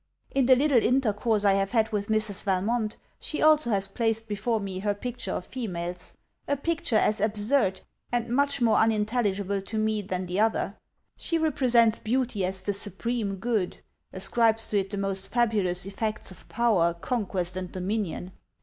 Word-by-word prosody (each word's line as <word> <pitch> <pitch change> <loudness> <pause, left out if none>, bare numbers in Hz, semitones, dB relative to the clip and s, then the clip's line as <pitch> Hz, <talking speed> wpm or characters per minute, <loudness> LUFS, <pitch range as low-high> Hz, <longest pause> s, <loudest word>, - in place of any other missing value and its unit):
In 270 -2 +2
the 260 - +7
little 270 -2 +3
intercourse 220 -4 +1
I 200 - +5
have 195 +1 0
had 220 -1 +2
with 205 -1 -2
Mrs. 215 -2 0
Valmont, 215 +3 0 0.2
she 305 - -4
also 305 -4 +4
has 195 -3 0
placed 225 +1 -1
before 215 +2 -1
me 195 -2 -5
her 205 +1 -1
picture 240 -2 -5
of - - -4
females: 180 -8 -4 0.3
a 285 - 0
picture 335 -2 -1
as 215 -1 +2
absurd 210 -1 +2 0.3
and 240 -1 0
much 280 +2 +1
more 225 -3 +4
unintelligible 210 -3 +1
to 220 +3 -5
me 215 0 +1
than 185 -1 -3
the 180 +2 -2
other. 220 -2 +1 0.4
She 335 - -1
represents 245 -8 +3
beauty 235 -3 -1
as 185 +1 0
the 205 - -1
supreme 205 +1 -2
good; 205 -2 -1 0.3
ascribes 225 +4 +1
to 205 - +2
it 195 0 -3
the 205 - -4
most 195 -1 -2
fabulous 210 -7 +1
effects 215 +1 -4
of 185 - -14
power, 195 -8 +2
conquest, 185 -3 -2
and 185 -1 -5
dominion. 185 -1 -3
215 Hz, 165 wpm, -27 LUFS, 195-235 Hz, 0.4 s, the